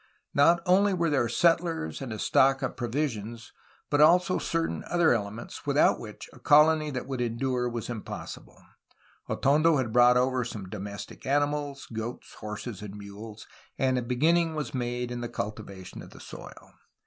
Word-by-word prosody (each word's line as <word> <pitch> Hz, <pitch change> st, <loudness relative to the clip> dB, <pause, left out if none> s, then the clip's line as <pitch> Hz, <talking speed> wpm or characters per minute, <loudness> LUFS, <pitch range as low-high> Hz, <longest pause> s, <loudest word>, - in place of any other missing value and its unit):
Not 170 Hz, +4 st, +4 dB
only 195 Hz, +2 st, +4 dB
were 170 Hz, -3 st, 0 dB
there 130 Hz, -5 st, +1 dB
settlers 165 Hz, -, +1 dB
and 130 Hz, -3 st, -5 dB
a 110 Hz, -, -4 dB
stock 135 Hz, +5 st, +3 dB
of 135 Hz, -, -2 dB
provisions, 120 Hz, -3 st, -3 dB, 0.4 s
but 145 Hz, -, +3 dB
also 180 Hz, +4 st, +5 dB
certain 165 Hz, 0 st, -2 dB
other 175 Hz, -4 st, +3 dB
elements 110 Hz, +1 st, -5 dB
without -, -, +3 dB
which -, -, -9 dB
a -, -, -15 dB
colony 155 Hz, +1 st, +5 dB
that 130 Hz, -3 st, -4 dB
would 130 Hz, -2 st, -4 dB
endure 125 Hz, +1 st, -1 dB
was 120 Hz, -2 st, -5 dB
impossible. 115 Hz, -4 st, -7 dB, 0.7 s
Atondo 155 Hz, +3 st, +3 dB
had 120 Hz, -4 st, -2 dB
brought 125 Hz, 0 st, +6 dB
over 130 Hz, 0 st, +1 dB
some 105 Hz, -5 st, -7 dB
domestic 100 Hz, +3 st, -7 dB
animals 145 Hz, 0 st, -1 dB
(goats, 110 Hz, +2 st, -6 dB
horses, 105 Hz, 0 st, -6 dB
and 105 Hz, -1 st, -8 dB
mules), 105 Hz, +2 st, -10 dB, 0.3 s
and 130 Hz, -1 st, +1 dB
a 125 Hz, -, 0 dB
beginning 160 Hz, +7 st, +2 dB
was 150 Hz, -6 st, -4 dB
made 120 Hz, -1 st, -3 dB
in 120 Hz, 0 st, -4 dB
the 120 Hz, -, -4 dB
cultivation 105 Hz, -4 st, -6 dB
of -, -, -11 dB
the -, -, -14 dB
soil. -, -, -12 dB
125 Hz, 160 wpm, -28 LUFS, 115-150 Hz, 0.7 s, brought